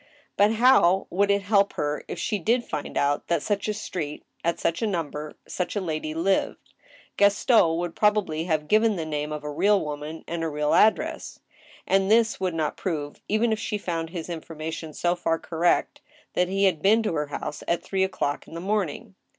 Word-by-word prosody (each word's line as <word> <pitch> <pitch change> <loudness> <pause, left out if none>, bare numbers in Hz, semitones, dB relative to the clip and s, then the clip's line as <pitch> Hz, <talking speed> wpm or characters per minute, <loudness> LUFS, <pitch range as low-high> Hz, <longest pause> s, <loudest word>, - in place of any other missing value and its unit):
But 205 +2 +4
how 220 -6 +5
would 200 +2 +2
it 200 0 +2
help 200 -1 +3
her 150 0 -2
if - - -5
she 210 -3 -1
did 235 +7 +1
find 145 - -5
out 145 +1 +1
that 170 - +2
in - - -2
such 205 -1 -1
a 215 - 0
street, 160 -7 -5 0.2
at 170 0 0
such 165 - -1
a 225 - +1
number, 155 -5 -4
such 180 +2 -3
a - - +1
lady 155 -4 -3
lived? 190 +4 -1 0.4
Gaston 200 -4 +4
would 175 -1 -3
prob 210 0 +3
ably 160 -5 -2
have 155 -3 -1
given 215 +2 +3
the 165 -3 -3
name 150 -1 -3
of 150 -1 -5
a 150 - -4
real 200 +7 +3
woman 150 +1 -6
and 170 -1 -3
a 165 - -1
real 150 0 0
address. 220 - +2 0.5
And 195 0 +2
this 225 +1 +3
would 185 -3 -1
not 155 -2 -1
prove, 150 -5 -4
even 220 +2 +2
if 215 - -3
she 210 -1 -2
found 165 -4 -3
his 170 -2 -6
information 160 -1 -6
so 175 +3 +1
far 165 -2 0
correct, 170 +1 0 0.3
that 180 - +2
he 195 +2 0
had 180 -6 +2
been 220 +3 +4
to 210 - -1
her 150 -2 -1
house 145 0 -5
at 170 0 0
three 190 +1 0
o'clock 145 -6 -2
in - - -11
the - - -4
morning. 200 +2 -2
175 Hz, 205 wpm, -25 LUFS, 155-205 Hz, 0.5 s, how